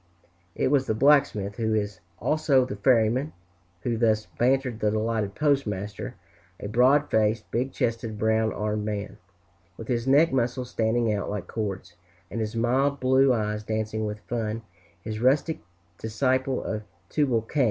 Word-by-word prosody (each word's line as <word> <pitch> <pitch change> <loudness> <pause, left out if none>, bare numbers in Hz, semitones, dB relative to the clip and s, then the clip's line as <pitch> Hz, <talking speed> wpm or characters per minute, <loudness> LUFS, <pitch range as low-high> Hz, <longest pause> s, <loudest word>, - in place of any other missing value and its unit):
It - - +1
was 135 -2 +2
the 110 - 0
blacksmith, 120 -7 +3
who 110 -2 0
is 105 -3 -2 0.2
also 145 -4 +2
the 125 - -5
ferryman, 120 +5 +2 0.5
who 115 +5 -1
thus 110 -2 +2
bantered 130 -2 0
the 105 - +2
delighted 110 -2 -1
postmaster, 105 -10 -1 0.4
a - - -5
broad 130 +7 +3
faced, 110 0 +1
big 125 +3 -1
chested, 115 -2 -2
brown 110 +1 +2
armed 105 0 -2
man, 105 0 -4 0.6
with 115 - -9
his 120 0 -1
neck 145 +3 +5
muscles 125 0 -1
standing 115 0 +1
out 100 - -2
like 105 -2 -4
cords, 95 -5 -4 0.4
and 115 - -3
his 110 +1 -3
mild 130 +4 +1
blue 130 +1 +4
eyes 105 -3 -1
dancing 110 0 -2
with 105 0 -6
fun, 110 +2 -3 0.4
this 110 -1 -4
rustic 140 +6 +2 0.4
disciple 130 +3 0
of 110 -1 -3 0.3
Tubal 130 -7 +1
Cain. 145 +6 -4
115 Hz, 150 wpm, -26 LUFS, 105-130 Hz, 0.6 s, neck